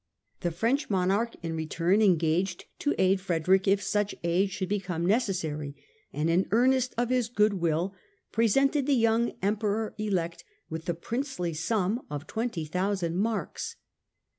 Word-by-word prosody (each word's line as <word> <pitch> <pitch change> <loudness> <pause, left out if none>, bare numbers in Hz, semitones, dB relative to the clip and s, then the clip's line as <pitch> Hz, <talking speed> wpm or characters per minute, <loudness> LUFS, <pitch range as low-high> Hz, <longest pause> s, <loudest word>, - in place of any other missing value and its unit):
The 175 - -1
French 230 - 0
monarch, 200 +4 +1
in 165 -1 -3
return, 170 +5 +1
engaged 175 -1 +2
to 295 - 0
aid 190 0 +3
Frederick 185 +2 +2
if 200 +1 +3
such 205 0 0
aid 175 +4 +2
should 185 0 -3
become 180 -4 -2
necessary, 175 - 0 0.4
and 150 +2 -1
in 175 +3 +2
earnest 255 +4 +3
of 240 0 +1
his 250 -3 +1
good 210 -5 +2
will 170 +3 0 0.4
presented 270 +5 +2
the 285 - +4
young 230 0 +2
Emperor 210 +1 0
elect 180 -6 -1 0.3
with 160 +1 -5
the 175 - -1
princely 225 - -3
sum 205 +7 0
of 145 0 -5
20,000 185 -4 -2
marks. 215 +4 -2
195 Hz, 140 wpm, -28 LUFS, 170-225 Hz, 0.4 s, the